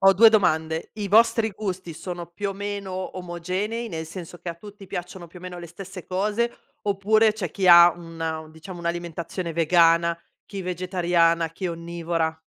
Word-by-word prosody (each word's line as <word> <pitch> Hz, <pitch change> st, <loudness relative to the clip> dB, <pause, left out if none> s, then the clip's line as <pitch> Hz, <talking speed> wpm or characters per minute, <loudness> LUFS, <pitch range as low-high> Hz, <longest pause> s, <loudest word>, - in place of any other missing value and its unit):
ho 195 Hz, 0 st, +7 dB
2 220 Hz, +4 st, +8 dB
domande: 160 Hz, -6 st, +1 dB
i 210 Hz, -1 st, -3 dB
vostri 225 Hz, +2 st, +4 dB
gusti 190 Hz, -4 st, -5 dB
sono 175 Hz, +1 st, -6 dB
più 200 Hz, +4 st, -4 dB
o -, -, -2 dB
meno 195 Hz, -2 st, -5 dB
omogenei, 185 Hz, +6 st, -3 dB
nel 160 Hz, -4 st, -5 dB
senso 175 Hz, +1 st, -9 dB
che 175 Hz, -, -7 dB
a 170 Hz, -, -3 dB
tutti 205 Hz, +3 st, -12 dB
piacciono 175 Hz, 0 st, -6 dB
più 180 Hz, -, -12 dB
o -, -, -16 dB
meno 180 Hz, -1 st, -7 dB
le 170 Hz, -, -9 dB
stesse 185 Hz, +1 st, -9 dB
cose, 210 Hz, +5 st, 0 dB, 0.3 s
oppure 210 Hz, +2 st, +3 dB
c'è 200 Hz, -6 st, -4 dB
chi 190 Hz, -2 st, +1 dB
ha 170 Hz, 0 st, +10 dB
una 165 Hz, -2 st, -5 dB
diciamo 170 Hz, +3 st, -10 dB
un'alimentazione 170 Hz, 0 st, -4 dB
vegana, 170 Hz, 0 st, +4 dB, 0.3 s
chi 195 Hz, -2 st, -6 dB
vegetariana, 175 Hz, -2 st, +1 dB
chi 180 Hz, +3 st, -4 dB
onnivora? 170 Hz, -1 st, -2 dB
180 Hz, 170 wpm, -24 LUFS, 170-195 Hz, 0.3 s, ha